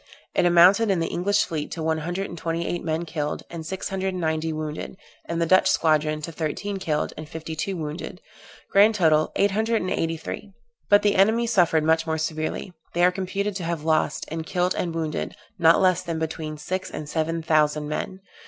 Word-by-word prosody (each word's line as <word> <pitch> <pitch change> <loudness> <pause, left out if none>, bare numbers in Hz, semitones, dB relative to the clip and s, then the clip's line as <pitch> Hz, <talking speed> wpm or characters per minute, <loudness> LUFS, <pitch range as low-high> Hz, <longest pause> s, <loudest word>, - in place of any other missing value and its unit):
It 175 - +3
amounted 180 +6 +6
in 190 -3 +2
the 165 - -1
English 205 +4 +2
fleet, 155 -3 -4
to 165 - -4
one 160 0 +1
hundred 175 +5 -3
and - - -8
twenty 165 0 -2
eight 175 - -3
men 160 +1 -1
killed, 150 -3 -3
and 170 -1 -6
six 185 +4 -4
hundred 190 -1 -2
and - - -3
ninety 160 -1 -1
wounded; 155 +3 -5 0.3
in 170 - -1
the 170 - +2
Dutch 185 +3 +5
squadron, 155 -1 +2
to 165 - -4
thirteen 165 +6 -3
killed, 155 -5 -1
and 155 -1 -8
fifty 160 0 -6
two 185 +4 -3
wounded; 155 +3 -5 0.5
grand 210 +3 +6
total, 155 -5 +3
eight 200 0 +3
hundred 220 +3 +1
and 185 - -3
eighty 165 0 -1
three. 200 +5 -7 0.4
But 205 0 +6
the 205 - +3
enemy 220 +5 +4
suffered 175 -8 +3
much 160 +1 +2
more 160 0 0
severly; 155 +3 -3 0.2
they 175 - +3
are 180 - +5
computed 195 +2 -3
to 180 - -5
have 165 -2 -3
lost, 155 -1 +1
in 160 +1 -4
killed 180 +2 0
and 170 -2 -3
wounded, 160 -2 -3 0.2
not 165 -1 +6
less 185 -2 +3
than 170 -3 -4
between 160 -1 -4
six 185 +5 -4
and 150 - -6
seven 165 +1 -1
thousand 150 -1 +2
men. 185 +5 -4
165 Hz, 210 wpm, -24 LUFS, 155-185 Hz, 0.5 s, amounted